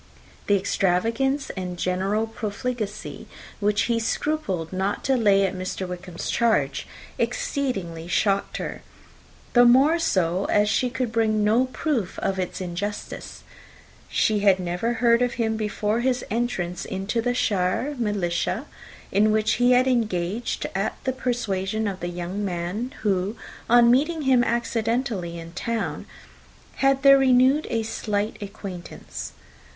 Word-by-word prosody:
The 205 - +4
extravagance 225 +9 0
and 180 -2 -5
general 190 +5 0
profligacy 220 -1 -5 0.3
which 205 +1 +2
he 235 -1 +1
scrupled 215 - -2
not 190 +2 -1
to 270 - +2
lay 200 -5 +4
to 190 0 -2
Mr. 185 0 -4
Wickham's 180 -1 -5
charge 220 -13 +1 0.3
exceedingly 215 -9 -2
shocked 195 +3 +1
her; - - -5 0.7
the 245 - +7
more 270 +7 +5
so, 185 - +1
as 210 0 +3
she 250 - +1
could 250 -2 -2
bring 220 -2 +2
no 225 +5 +4
proof 255 - -2
of 190 -1 -1
its 180 - -3
injustice. 190 +3 -5 0.7
She 215 -1 +2
had 195 -2 +4
never 180 +6 -1
heard 235 0 +3
of 245 -1 +1
him 225 -2 0
before 215 0 -1
his 250 0 0
entrance 205 -7 -2
into 195 +5 -2
the 245 +1 0
shire 205 +5 0
militia, 200 -6 -1 0.5
in 215 +2 +4
which 215 0 +2
he 245 +1 +6
had 250 +1 +4
engaged 220 -3 -1
at 195 +2 -1
the 260 - 0
persuasion 220 -5 -1
of 190 -2 -4
the 175 - -3
young 175 +3 -4
man, 185 +6 -3
who, 195 0 0 0.3
on 235 0 +7
meeting 305 +5 +2
him 260 -3 +4
accidentally 230 -6 -1
in 165 0 -9
town, 230 +5 -3 0.7
had 275 0 +2
there 275 0 +8
renewed 260 +3 +4
a 225 -1 0
slight 210 -1 -2
acquaintance. 195 -3 -7
215 Hz, 135 wpm, -24 LUFS, 190-245 Hz, 0.7 s, there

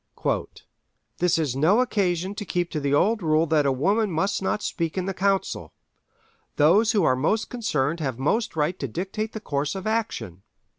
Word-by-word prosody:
"This 180 -2 +2
is 150 -6 -1
no 160 - +4
occasion 190 -6 0
to 205 - -5
keep 175 -2 -2
to 155 - -2
the 140 -1 -1
old 205 +10 +2
rule 155 -1 +2
that 155 -3 +2
a - - +3
woman 200 - +1
must 195 +5 0
not 200 +2 -1
speak 165 0 -2
in 185 - -1
the 195 - -2
council. 195 +1 -1 0.8
Those 195 +9 +4
who 205 -4 +3
are 130 -5 +3
most 165 +12 0
concerned 165 - -1
have 135 -6 -2
most 200 - 0
right 160 +4 0
to 135 - -2
dictate 195 - -4
the 220 - -5
course 145 -5 -2
of 190 +1 -6
action. 215 - -2
175 Hz, 185 wpm, -25 LUFS, 150-205 Hz, 0.8 s, no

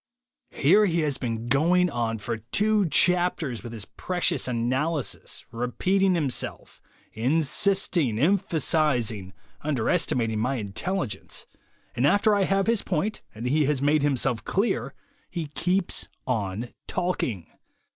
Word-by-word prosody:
"Here 200 +9 +4
he 170 -2 +1
has 145 -3 -1
been 115 -2 -3
going 170 +8 +3
on 115 -2 -1
for 115 +2 -3
two 200 - +1
chapters 175 -8 +2
with 120 - -8
his 110 -3 -3
precious 175 -6 -1
analysis, 130 +5 -2
repeating 185 +11 +1
himself, 145 -7 -3 0.3
insisting, 155 - +1
emphasizing, 150 - +1 0.3
underestimating 115 -5 0
my 125 +5 0
intelligence, 110 - -3 0.5
and 125 +4 +3
after 205 +6 +4
I 200 -1 +2
have 195 0 +1
his 230 -2 +2
point, 195 +5 -2
and 115 +3 -6
he 145 +4 +2
has 145 -1 +1
made 145 +2 +3
himself 130 -5 +1
clear, 185 - -1 0.3
he 170 -5 -4
keeps 180 +5 -1 0.2
on 110 -1 -2
talking. 125 - -2
145 Hz, 120 wpm, -26 LUFS, 120-180 Hz, 0.5 s, Here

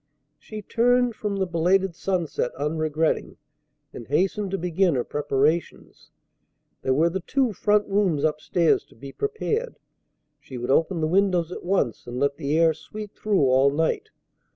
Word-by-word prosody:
She 215 -1 -9
turned 245 +2 +2
from 210 -2 -3
the 195 -1 0
belated 180 +2 +1
sunset 175 -7 -2
unregretting, 155 +2 -1 0.6
and 115 - -9
hastened 190 +7 0
to 195 - -2
begin 180 -1 +1
her 125 - 0
preparations. 150 +3 -2 0.7
There 130 - +1
were 165 +4 +3
the 190 - -2
two 260 +1 0
front 210 +2 +2
rooms 195 -7 +1
up 155 0 -1
stairs 170 0 +2
to - - -22
be 135 +4 -10
prepared. 440 - -3 0.6
She 130 - -10
would 120 +2 -2
open 165 +4 +2
the 155 - +1
windows 180 -1 +1
at - - -7
once, 175 - -1
and 120 +1 -5
let 140 0 0
the 150 0 -1
air 165 -1 +4
sweep 205 +7 -9
through 205 -7 +1
all 130 +1 +4
night. 165 - -1
170 Hz, 160 wpm, -24 LUFS, 150-200 Hz, 0.7 s, air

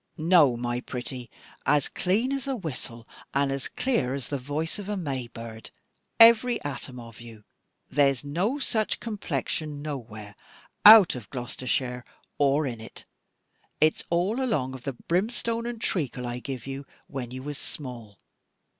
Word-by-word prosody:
"No, 155 -6 +5
my 120 0 -2
pretty, 125 0 -5 0.3
as 145 -1 +3
clean 215 +8 0
as 275 0 -3
a 270 - 0
whistle, 125 - -6 0.3
and 140 0 +2
as 135 -1 -2
clear 140 - 0
as 135 -3 -6
the 140 - -2
voice 150 +8 -3
of 205 0 -6
a 210 - -1
May 135 -8 -3
bird, 115 -1 -9 0.5
every 230 +1 +7
atom 135 -3 -5
of 115 -1 -11
you. 115 -2 -12 0.4
There's 140 -4 +2
no 180 - 0
such 220 -6 0
complexion 155 - -3
nowhere 110 -8 -7 0.5
out 215 -3 +11
of 120 -6 -8
Gloshire 125 0 -2 0.4
or 145 +1 +3
in 120 -4 -4
it: 110 - -10 0.7
and 155 - +7
its - - -9
all 185 +9 +1
along 135 - 0
of 130 -2 -9
the 140 - -2
brimstone 230 - -1
and 240 -1 -5
treacle 135 - -2
I 120 0 -3
give 130 -2 -6
you, 135 +1 -6 0.2
when 130 -3 -5
you 130 +1 -7
was 145 0 -5
small. 120 -8 -8
140 Hz, 155 wpm, -27 LUFS, 125-185 Hz, 0.7 s, out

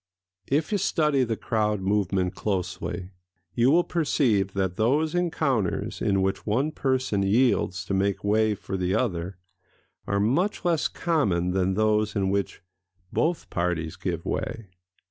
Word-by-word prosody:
If 150 +6 0
you 205 - +1
study 150 -6 +2
the 115 -3 -2
crowd 105 -2 0
movement 95 -2 0
closely, 95 -1 -3 0.4
you 120 +2 +3
will 170 +5 +5
perceive 120 - +1
that 95 -2 -1
those 145 +8 +1
encounters 155 - -1
in 95 -1 +2
which 95 0 -1
one 130 +9 +1
person 130 -8 0
yields 95 -4 +2
to 100 - -3
make 100 0 0
way 110 +1 +2
for 95 -1 -5
the 90 +1 0
other 90 -6 -2 0.7
are 100 - +1
much 170 - +1
less 165 -3 +2
common 100 - 0
than 95 0 +1
those 110 0 +1
in 95 -2 +1
which 100 -2 -2 0.5
both 170 +1 0
parties 85 -2 -1
give 85 -3 -4
way. 110 -4 -3
105 Hz, 145 wpm, -26 LUFS, 95-135 Hz, 0.7 s, will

